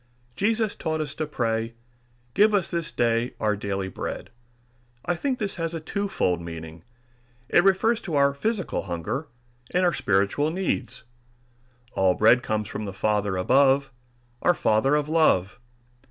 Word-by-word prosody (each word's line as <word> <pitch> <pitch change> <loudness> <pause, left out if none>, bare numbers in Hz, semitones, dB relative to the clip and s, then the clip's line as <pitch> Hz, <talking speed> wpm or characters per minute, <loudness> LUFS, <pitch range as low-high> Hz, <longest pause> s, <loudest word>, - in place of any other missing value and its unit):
Jesus 220 - +1
taught 160 -2 -3
us 150 -2 -3
to 155 0 -3
pray, 115 -4 -2 0.6
"Give 210 +6 +4
us 190 -4 +1
this 170 -2 -1
day 120 +1 0
our 105 -1 +1
daily 100 -1 -3
bread." 95 - -6 0.7
I 175 - +1
think 260 +8 -2
this 205 -5 -2
has 165 0 -3
a - - -3
twofold 160 - -1
meaning. 80 -1 -8 0.7
It 175 - +5
refers 220 +4 +3
to 165 - -4
our 140 0 +4
physical 200 +6 -2
hunger 90 - -4 0.5
and 180 0 +3
our 175 - +3
spiritual 100 +10 +1
needs. 185 +2 -3 0.9
All 95 -1 +2
bread 115 +3 +5
comes 110 -2 -2
from 110 - -5
the 100 - -5
Father 105 -1 0
above, 135 +6 +3 0.5
our 175 - +3
Father 120 +7 +2
of 150 -1 0
love. 140 - +2
140 Hz, 150 wpm, -25 LUFS, 105-175 Hz, 0.9 s, It